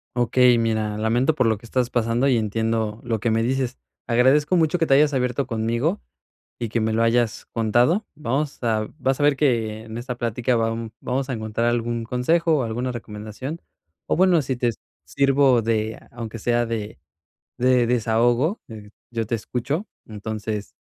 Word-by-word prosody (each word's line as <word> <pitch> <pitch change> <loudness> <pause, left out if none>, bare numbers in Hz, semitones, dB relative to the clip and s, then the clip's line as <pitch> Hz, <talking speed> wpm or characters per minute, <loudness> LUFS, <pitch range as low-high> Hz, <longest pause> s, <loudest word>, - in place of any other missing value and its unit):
Okey, 125 0 +4
mira, 110 -2 0
lamento 120 +7 +2
por 130 - +2
lo 110 -1 +2
que 115 - -15
estás 125 +1 0
pasando 120 +2 +1
y 130 - +3
entiendo 110 0 -1
lo 115 -3 -1
que 115 -1 +1
me 115 0 +2
dices. 130 0 -1 0.3
Agradezco 135 +8 +3
mucho 160 +1 +2
que 165 - +1
te 135 - +3
hayas 145 +1 +5
abierto 125 0 0
conmigo 115 - -1 0.6
y 115 -2 -3
que 115 - 0
me 110 0 0
lo 115 - +2
hayas 115 -1 +1
contado. 120 - +2
Vamos 145 +1 -2
a 110 -2 0
vas 135 -1 0
a - - +1
ver 145 -1 +4
que 115 -6 0
en 110 0 -7
esta 125 0 -5
plática 120 +1 0
va 115 0 +1 0.3
vamos 130 +2 -2
a 130 - -2
encontrar 110 +1 -2
algún 120 -1 -1
consejo 160 +8 +2
o 135 - 0
alguna 120 +3 -2
recomendación, 110 +6 -7 0.5
o - - 0
bueno, 180 -2 +4
si 130 -2 -2
te 120 -1 +1 0.3
sirvo 135 -2 +3
de, 110 -1 -1
aunque 115 -1 -7
sea 120 +2 +1
de 110 -5 -4 0.6
de 125 -1 +4
desahogo, 120 - +2
eh, 105 -2 -10 0.2
yo 115 -2 -2
te 115 - 0
escucho. 125 - -3 0.2
Entonces, 105 -1 -5
120 Hz, 175 wpm, -23 LUFS, 110-130 Hz, 0.6 s, hayas